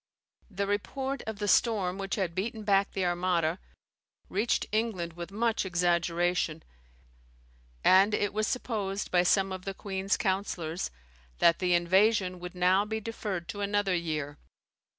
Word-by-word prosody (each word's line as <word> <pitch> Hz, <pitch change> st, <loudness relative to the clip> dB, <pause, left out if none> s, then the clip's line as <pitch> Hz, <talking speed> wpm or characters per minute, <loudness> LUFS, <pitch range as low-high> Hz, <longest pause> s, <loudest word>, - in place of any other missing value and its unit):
The 200 Hz, -1 st, -2 dB
report 265 Hz, +7 st, -2 dB
of 220 Hz, -2 st, -4 dB
the 205 Hz, 0 st, -3 dB
storm 200 Hz, -3 st, +2 dB
which 195 Hz, -1 st, -2 dB
had 185 Hz, -5 st, -1 dB
beaten 215 Hz, +4 st, -3 dB
back 200 Hz, -1 st, +2 dB
the 190 Hz, -2 st, -1 dB
Armada 175 Hz, -1 st, 0 dB, 0.7 s
reached 210 Hz, +5 st, 0 dB
England 210 Hz, -6 st, -1 dB
with 170 Hz, 0 st, -7 dB
much 225 Hz, +2 st, 0 dB
exaggeration, 175 Hz, -2 st, 0 dB, 1.2 s
and 195 Hz, +3 st, +6 dB
it 205 Hz, -1 st, -1 dB
was 215 Hz, 0 st, 0 dB
supposed 205 Hz, -6 st, -2 dB
by 180 Hz, -, +4 dB
some 195 Hz, +2 st, +2 dB
of 185 Hz, -1 st, -5 dB
the 195 Hz, 0 st, -5 dB
queen's 195 Hz, 0 st, -1 dB
counsellors 185 Hz, -4 st, -2 dB, 0.5 s
that 170 Hz, -, +4 dB
the 180 Hz, -1 st, +2 dB
invasion 185 Hz, +1 st, +3 dB
would 180 Hz, +1 st, -8 dB
now 180 Hz, +2 st, +3 dB
be 220 Hz, +1 st, -3 dB
deferred 205 Hz, -5 st, -4 dB
to 205 Hz, -, -5 dB
another 205 Hz, -1 st, +1 dB
year. 155 Hz, -4 st, -3 dB
190 Hz, 145 wpm, -29 LUFS, 175-205 Hz, 1.2 s, and